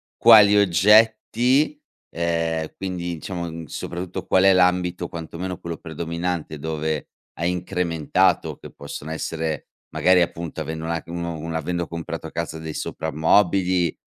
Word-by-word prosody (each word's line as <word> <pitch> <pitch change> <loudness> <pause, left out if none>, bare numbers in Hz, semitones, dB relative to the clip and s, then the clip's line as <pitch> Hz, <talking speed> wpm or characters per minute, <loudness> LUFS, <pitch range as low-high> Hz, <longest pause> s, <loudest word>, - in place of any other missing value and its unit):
quali 105 -3 +8
oggetti, 110 - +4 0.3
ehm, 85 -1 -1
quindi 90 -2 -4
diciamo 85 -2 -6
soprattutto 90 +1 -5
qual 95 - +3
è 95 0 +7
l'ambito 90 -1 +2
quantomeno 85 +2 -6
quello 85 -1 -5
predominante, 85 0 -4
dove 80 0 -3 0.3
hai 85 +2 0
incrementato 90 -4 0
che - - -11
possono 70 +2 -8
essere, 80 -1 -3 0.3
magari 90 0 +4
appunto, 85 -2 -3
avendo 80 +1 -5
una 85 0 -2
un 85 0 -5
un 80 -1 -5
avendo 85 +2 -2
comprato 85 -1 -6
casa 80 - -4
dei 80 -1 -6
soprammobili, 90 +2 +1
85 Hz, 125 wpm, -23 LUFS, 80-90 Hz, 0.3 s, quali